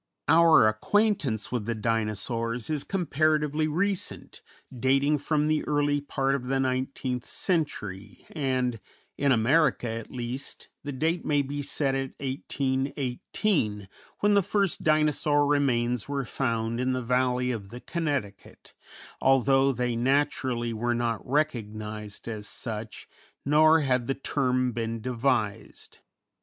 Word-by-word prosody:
Our 160 -5 +6
acquaintance 140 - +1
with 120 -4 -2
the 115 - -1
Dinosaurs 115 +3 -2
is 150 -2 -1
comparatively 155 -3 +1
recent, 185 +5 -3 0.3
dating 135 +4 +2
from 150 +1 0
the 155 0 +1
early 145 -1 +1
part 135 -1 -1
of 130 -2 -3
the 135 +1 +1
nineteenth 130 -1 -2
century, 105 - -3
and 130 -6 -1 0.4
in 140 0 +2
America, 130 +2 +3
at 115 0 -5
least, 125 +2 -5
the 145 - -4
date 160 +6 -1
may 145 -1 +2
be 145 +1 -4
set 140 -1 -1
at 135 -1 -2
1818, 135 - -1 0.3
when 205 0 +4
the 200 - +5
first 200 -1 0
Dinosaur 150 -1 +2
remains 125 -5 +1
were 140 -2 -2
found 115 -3 -1
in 130 +1 +1
the 130 -1 -2
Valley 125 +1 +1
of 105 -5 -5
the 120 - -8
Connecticut, 140 - -4 0.5
although 135 +1 +4
they 125 -1 -1
naturally 130 -2 0
were 120 +2 0
not 115 -2 -1
recognized 110 -8 -3
as 105 -2 -5
such, 110 -2 -6 0.4
nor 155 +3 +5
had 125 -4 +1
the 135 - 0
term 130 -2 0
been 115 -1 -3
devised. 120 -3 -2
130 Hz, 125 wpm, -27 LUFS, 115-145 Hz, 0.5 s, Our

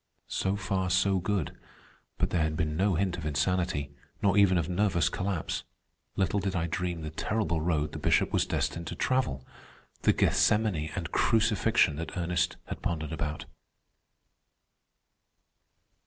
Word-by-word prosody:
So 95 +1 -1
far 95 -1 -1
so 95 +1 +3
good, 90 -3 -1 0.6
but - - 0
there 85 - +1
had 80 0 0
been 75 -2 -1
no 95 +2 +2
hint 90 0 0
of 80 - -6
insanity, 75 0 0 0.3
nor 100 -1 +2
even 100 -3 +5
of 85 -2 0
nervous 90 -1 +2
collapse. 95 -3 -2 0.5
Little 95 +1 +1
did 95 -1 -2
I 85 -1 0
dream 85 0 -2
the 75 - -5
terrible 85 -1 -1
road 75 -2 0
the - - -6
Bishop - - +2
was - - +2
destined 85 0 -2
to - - -4
travel—the 85 - -2
Gethsemane 105 -8 +2
and - - -4
crucifixion 110 -7 +3
that 80 +3 -5
Ernest 90 +1 0
had - - -7
pondered 80 -3 -2
about. 75 -1 -3
90 Hz, 140 wpm, -29 LUFS, 80-100 Hz, 0.6 s, even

